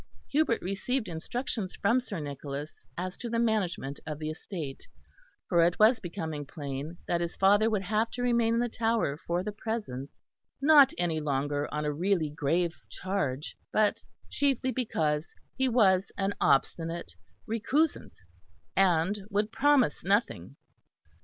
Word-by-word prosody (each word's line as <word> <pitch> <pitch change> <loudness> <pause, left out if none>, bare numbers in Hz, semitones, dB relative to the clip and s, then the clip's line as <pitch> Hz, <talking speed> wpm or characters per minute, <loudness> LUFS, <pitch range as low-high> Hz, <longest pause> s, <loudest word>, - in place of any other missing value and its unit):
Hubert 290 -5 +2
received 215 +7 -1
instructions 190 +4 -4
from 230 +5 +2
Sir 215 -8 -5
Nicholas 145 0 -6
as 185 +1 -3
to 240 - -5
the 230 - -1
management 195 -11 0
of 150 -2 -3
the 155 0 -3
estate, 155 -4 -7 0.6
for 170 -1 +4
it 175 +1 +2
was 220 +2 +5
becoming 160 -5 -4
plain 145 +2 -6
that 170 0 +1
his 170 0 -3
father 205 +3 +4
would 210 -3 0
have 215 +4 +1
to 245 - -3
remain 235 -2 +3
in - - +2
the 240 - +1
Tower 225 -10 0
for 175 +1 0
the 210 - -3
present; 205 - -4 0.5
not 285 -1 +7
any 170 -3 0
longer 145 0 -1
on 150 0 -2
a 150 - 0
really 170 -1 +1
grave 165 +4 0 0.2
charge, 160 -7 -3 0.2
but 215 -1 +2 0.3
chiefly 270 -2 +1
because 160 -11 -1 0.2
he 265 0 +1
was 195 -6 +3
an 195 0 0
obstinate 165 - +1 0.3
recusant 270 +8 0 0.6
and 190 +1 +3
would 210 +1 0
promise 280 - +3
nothing. 200 +6 0
190 Hz, 145 wpm, -29 LUFS, 155-230 Hz, 0.6 s, not